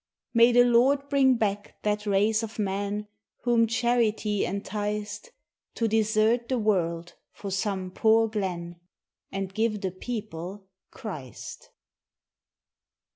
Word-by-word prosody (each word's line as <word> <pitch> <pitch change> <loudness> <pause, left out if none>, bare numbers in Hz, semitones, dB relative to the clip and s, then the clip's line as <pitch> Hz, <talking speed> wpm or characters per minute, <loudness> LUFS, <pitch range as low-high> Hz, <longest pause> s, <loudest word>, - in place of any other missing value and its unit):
May 235 +1 +6
the 245 0 +6
Lord 265 +4 +3
bring 270 -2 +4
back 205 -3 -2
that 210 0 -1
race 210 +3 +3
of 225 -1 -6
men 205 +1 -2 0.4
Whom 235 -1 +3
charity 225 -3 +1
enticed 210 - -4 0.5
To 230 - +1
desert 220 +2 +2
the 260 - +1
world 175 -6 0 0.2
for 200 - -7
some 190 -1 -2
poor 225 +3 +4
glen 175 -5 -4 0.5
And 195 -1 -4
give 215 -1 0
the 190 -2 -2
people 195 -2 -6 0.2
Christ. 150 - -8
210 Hz, 115 wpm, -27 LUFS, 195-230 Hz, 0.5 s, May